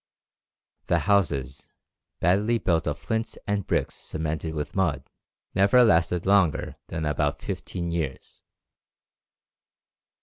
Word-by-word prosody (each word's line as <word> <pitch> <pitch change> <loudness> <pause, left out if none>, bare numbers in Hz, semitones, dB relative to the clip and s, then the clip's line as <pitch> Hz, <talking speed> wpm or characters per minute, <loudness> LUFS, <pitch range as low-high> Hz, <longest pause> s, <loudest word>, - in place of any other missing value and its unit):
The - - +3
houses, 70 -10 0 0.5
badly 100 +7 +3
built 85 -7 0
of 75 -1 -1
flints 110 0 -3
and 100 -2 -1
bricks - - 0
cemented 80 0 -4
with 75 -1 -4
mud, 95 -6 +1 0.5
never 100 +6 +5
last 85 -7 +4
longer 95 -5 +2
than 80 -1 -3
about 75 0 0
fifteen 85 -2 -4
years." 80 -6 -4
85 Hz, 105 wpm, -26 LUFS, 75-100 Hz, 0.5 s, never